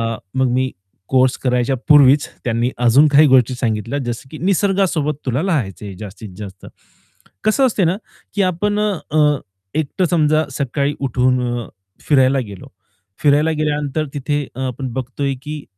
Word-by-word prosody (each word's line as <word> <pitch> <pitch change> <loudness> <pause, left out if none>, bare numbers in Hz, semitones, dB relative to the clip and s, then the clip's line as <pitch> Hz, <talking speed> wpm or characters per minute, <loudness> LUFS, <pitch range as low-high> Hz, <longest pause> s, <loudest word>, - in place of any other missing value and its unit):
अ, - - -9 0.2
मग 130 - +3
मी 130 +1 0 0.4
कोर्स 130 -1 +3
करायच्या 125 0 0
पूर्वीच 145 -2 +6 0.2
त्यांनी 120 0 0 0.2
अजून 135 +6 +6
काही 150 +2 +6
गोष्टी 130 -1 +4
सांगितल्या 115 +2 -2
जसं, 120 +2 -5
की 155 - -7
निसर्गासोबत 185 -4 +1
तुला 130 +2 0
राहायचे 110 - -2
जास्तीत 105 +1 -9
जास्त, 100 -2 -9 0.8
कसं 215 +6 +3
असते 220 -6 +1
ना, 175 +4 +1 0.4
की 205 - 0
आपण 205 +3 0
अ, 155 -8 +1 0.4
एकटं 155 +4 0
समजा 155 -2 +3
सकाळी 140 +1 -1
उठून 125 -3 0 0.3
फिरायला 135 -2 +3
गेलो, 100 -2 -10 0.5
फिरायला 150 +2 +3
गेल्यानंतर 150 0 -1
तिथे 145 +1 -1
अ, - - -8
आपण 130 +1 -5
बघतोय, 135 +2 -2
की 150 -1 -6
140 Hz, 140 wpm, -19 LUFS, 125-155 Hz, 0.8 s, पूर्वीच